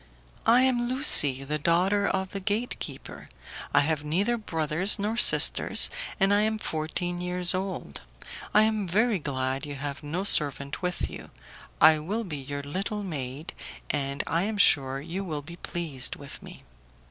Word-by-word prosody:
"I 240 +3 +5
am 245 -2 +1
Lucie, 150 - +3
the 150 +2 -2
daughter 185 +6 +1
of 190 0 -2
the 200 - -5
gate 210 +5 -3
keeper: - - -9 0.4
I - - +4
have 150 0 -1
neither 190 +10 0
brothers 165 -3 +2
nor 210 +2 -2
sisters, 240 - +5 0.3
and 195 0 +3
I 205 - +3
am 220 +1 0
fourteen 175 0 -3
years 180 0 +1
old. 185 - -5 0.5
I 215 - +5
am 215 -3 -1
very 215 +3 +1
glad 135 -1 -3
you 145 - -7
have 140 +1 -6
no 160 +5 -4
servant 140 -6 +4
with 180 -1 -2
you; - - -10 0.5
I 155 0 +6
will 205 +9 -4
be 165 -8 -6
your 140 +1 -7
little 195 +8 -4
maid, 145 -3 -6 0.4
and 140 -1 -3
I 165 +2 0
am 210 +2 -3
sure 135 -7 +3
you 170 +6 -5
will 155 -6 -5
be 170 +3 -11
pleased 160 -8 0
with 140 -1 -9
me." - - -11
175 Hz, 165 wpm, -26 LUFS, 145-205 Hz, 0.5 s, I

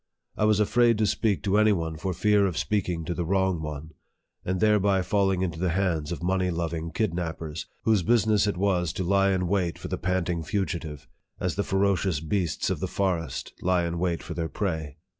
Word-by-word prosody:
I 105 - +1
was 105 -1 +3
afraid 115 +2 +3
to 110 - +2
speak 105 -1 0
to 100 +1 +2
any 110 0 +5
one 80 -3 -2
for 95 +4 -3
fear 100 +2 +3
of 90 - -4
speaking 90 -6 -1
to 85 - -2
the 85 - -2
wrong 95 -1 +1
one, 75 0 -6 0.5
and 95 0 -1
thereby 100 -3 +3
falling 95 -2 +1
into 85 -3 -3
the 90 0 +1
hands 85 -3 0
of 85 - -5
money 95 0 +1
loving 85 -1 -3
kidnappers, 80 -5 -3 0.2
whose 110 -4 +3
business 110 +1 +3
it 100 - -1
was 90 -3 +1
to 95 - -2
lie 100 +2 +3
in 95 -2 0
wait 90 -3 0
for - - -7
the - - -3
panting 90 -1 -1
fu 95 +5 -1
gitive, 80 -5 -6 0.3
as 90 - -1
the 100 - -1
ferocious 95 -4 +1
beasts 85 +2 -1
of - - -2
the - - -2
forest 85 -7 -2
lie 90 -1 +2
in 85 0 -3
wait 85 -2 -1
for - - -6
their 80 -2 -3
prey. 80 -7 -3
90 Hz, 205 wpm, -26 LUFS, 85-100 Hz, 0.5 s, any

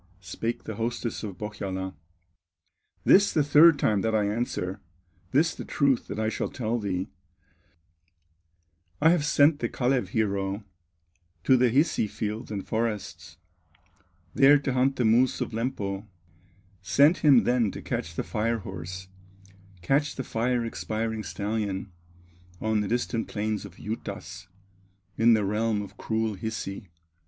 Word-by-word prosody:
Spake 115 +6 -4
the 110 - -6
hostess 115 0 -3
of 100 -5 -6
Pohyola: 95 -3 -4 1.1
"This 200 +1 +6
the 155 - +2
third 150 +2 +7
time 105 -2 +1
that 110 +1 0
I 105 - +2
answer, 100 -3 -2 0.5
This 155 +5 +2
the - - -7
truth 140 -4 +1
that - - -5
I 110 0 0
shall 110 - -2
tell 120 -1 -2
thee: 95 -3 -3 1.9
I 160 - +5
have 175 -4 +2
sent 145 +1 +4
the 120 - -1
Kalew 125 -4 0
hero 100 0 -1 0.8
To 130 - +5
the 125 -1 +4
Hisi 135 -3 +2
fields 110 +4 -4
and 100 -2 -4
forests, 110 -7 -3 1.0
There 140 +2 +7
to 140 -2 -2
hunt 130 +2 +2
the 125 - 0
moose 120 +3 +3
of - - -3
Lempo; 110 -4 -3 0.7
Sent 140 - +4
him 140 -6 +6
then 120 -3 +2
to - - -7
catch 80 +1 -4
the - - -2
fire 115 +1 -1
horse, 95 -2 -7 0.8
Catch 145 +8 +1
the 130 - -4
fire 120 +1 -1
expiring 110 -1 -3
stallion, 100 -2 -3 0.7
On 110 -1 +1
the 105 - -2
distant 120 0 -1
plains 105 -1 -3
of 95 -3 -12
Juutas, 100 -3 -7 0.7
In 115 +1 +5
the 105 -2 0
realm 105 +1 0
of 100 - -11
cruel 110 -1 -1
Hisi. 100 -2 -5
110 Hz, 140 wpm, -27 LUFS, 100-125 Hz, 1.9 s, third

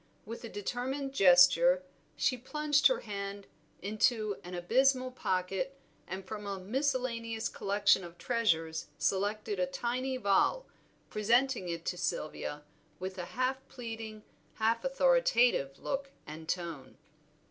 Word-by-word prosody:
With 230 +3 -7
a 230 - -6
determined 260 +7 -3
gesture 235 - +6 0.3
she 255 - +2
plunged 285 +2 +3
her 260 - 0
hand 200 -1 -5 0.4
into 215 0 +1
an 180 0 -7
abysmal 255 +8 +2
pocket, 195 +4 -2 0.3
and 190 +1 -6
from 210 +1 -6
a 200 -1 -3
miscellaneous 235 0 -1
collection 200 -1 +2
of 170 0 -10
treasures 165 -10 0
selected 205 +1 -1
a 180 - +2
tiny 250 +7 -2
vial, 255 - +2 0.5
presenting 235 -1 +2
it 170 -1 -4
to 180 - -2
Sylvia 150 -3 -3 0.3
with 185 +1 -5
a 175 - -3
half 255 +1 +1
pleading, 225 -3 -7 0.3
half 230 +1 +1
authoritative 270 - +3
look 275 0 -3 0.2
and 160 +1 -9
tone. 170 -7 -4
220 Hz, 125 wpm, -32 LUFS, 185-260 Hz, 0.5 s, gesture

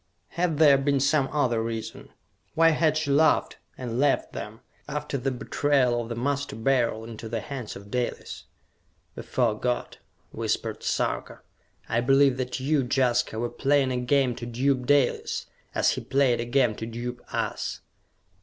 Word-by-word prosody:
Had 170 -3 -1
there 145 -3 +6
been 140 0 +1
some 140 0 +2
other 125 -7 +1
reason? 115 -1 -5 0.5
Why 165 0 +6
had 155 -1 +2
she 150 -2 -1
laughed, 155 +3 +3 0.2
and 120 -1 -4
left 145 0 +1
them, 110 +2 -7 0.3
after 150 -1 -4
the 135 0 -1
betrayal 130 -1 +1
of 115 - -7
the 115 - -3
Master 140 +1 -2
Beryl 115 -1 +1
into 115 -1 -8
the 115 0 -2
hands 125 -1 -6
of 100 +1 -11
Dalis? 125 -1 -3 0.7
"Before 115 -4 -1
God," 125 -1 -2 0.3
whispered - - -2
Sarka, - - -2 0.5
"I 115 - +1
believe 135 +1 +4
that 130 0 -3
you, 140 +1 +1
Jaska, 125 -4 +1
were 120 +2 -1
playing 135 +1 +1
a 125 - -1
game 125 +1 +2
to 120 - -6
dupe 125 +1 0
Dalis, 145 -3 +1 0.3
as - - +3
he - - -3
played 135 -3 +2
a 120 - -2
game 120 -2 +2
to 110 - -5
dupe 120 +1 -5
us!" - - -3
130 Hz, 160 wpm, -26 LUFS, 120-140 Hz, 0.7 s, there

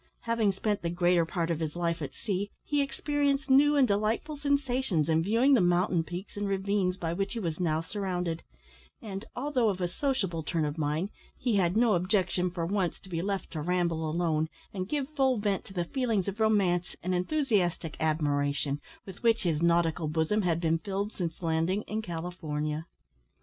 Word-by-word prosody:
Having 230 -4 +1
spent 205 +2 -1
the 170 - -1
greater 175 -1 +3
part 170 -1 -1
of 165 - -1
his 160 -1 -3
life 170 -1 -1
at 145 - -5
sea, 200 0 -2
he 290 -1 +1
experienced 280 0 0
new 290 +2 +6
and 275 -3 +5
delightful 215 +8 0
sensations 265 - +1
in 160 0 +3
viewing 230 +10 +4
the 245 - +6
mountain 175 -1 +3
peaks 175 +4 -7
and 205 0 -2
ravines, 195 -1 0
by 165 -3 -2
which 195 +3 -2
he 235 - -3
was 165 -5 -3
now 160 -3 +1
surrounded; 180 -2 -3 0.6
and, 200 0 -6
although 255 -3 +1
of 190 -2 -2
a 180 - +1
sociable 190 - -1
turn 160 0 -1
of 145 0 -2
mind, 155 +5 -1 0.3
he 235 -5 +1
had 180 +1 +2
no 230 -2 +4
objection 180 0 +1
for 175 -2 -3
once 190 -1 -1
to 190 - -15
be 165 -2 -2
left 195 +1 -2
to 155 - -4
ramble 170 -1 0
alone, 160 -1 0 0.2
and 185 -1 -4
give 285 -3 -1
full 270 -4 +2
vent 205 -2 -1
to 195 - -12
the 175 -1 0
feelings 225 -4 0
of 200 +2 -4
romance 195 -5 +2
and 185 +1 0
enthusiastic 180 - 0
admiration, 145 -2 0 0.2
with 190 -2 -10
which 230 -2 +3
his 165 -4 +1
nautical 170 -1 +2
bosom 160 +7 +1
had 170 -4 +1
been 165 -1 +1
filled 200 +2 -3
since 170 -1 -4
landing 165 +5 +1
in 215 +1 -3
California. 160 -4 -4
185 Hz, 185 wpm, -29 LUFS, 165-215 Hz, 0.6 s, new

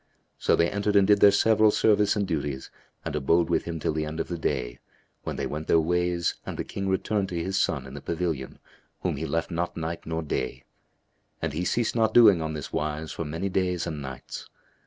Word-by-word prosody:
So - - +3
they 85 - +3
entered 100 +2 -1
and 100 -1 +6
did 105 +1 +5
their 100 - +8
several 110 +2 +4
service 105 -1 +3
and 100 -2 0
duties 75 -5 -3 0.3
and - - -3
abode 80 +4 +2
with - - +1
him 85 -1 -4
till 80 - -1
the 80 0 -2
end 80 +1 -5
of - - -2
the 85 - -3
day, 65 -5 -2 0.4
when - - -4
they - - -2
went 75 +1 -4
their 80 - +5
ways 90 +1 +1
and - - -6
the - - -2
King 100 0 -4
returned 95 +1 0
to 85 -2 -2
his 95 +1 -1
son 70 -7 0
in 65 - -10
the 70 - -7
pavilion 80 -6 -3 0.4
whom - - -1
he 80 +3 -3
left 85 +2 -1
not 85 +1 -2
night 80 0 -4
nor 80 0 -2
day; 65 -4 -3 0.8
and 80 -3 -2
he 85 +4 -2
ceased 115 +6 0
not 110 -2 +2
doing 105 -8 +7
on 80 0 -3
this 75 - -6
wise 75 +1 -2
for 85 - -4
many 80 +6 -3
days 90 -2 0
and 75 -3 -4
nights. 65 -2 -8
85 Hz, 220 wpm, -26 LUFS, 75-95 Hz, 0.8 s, their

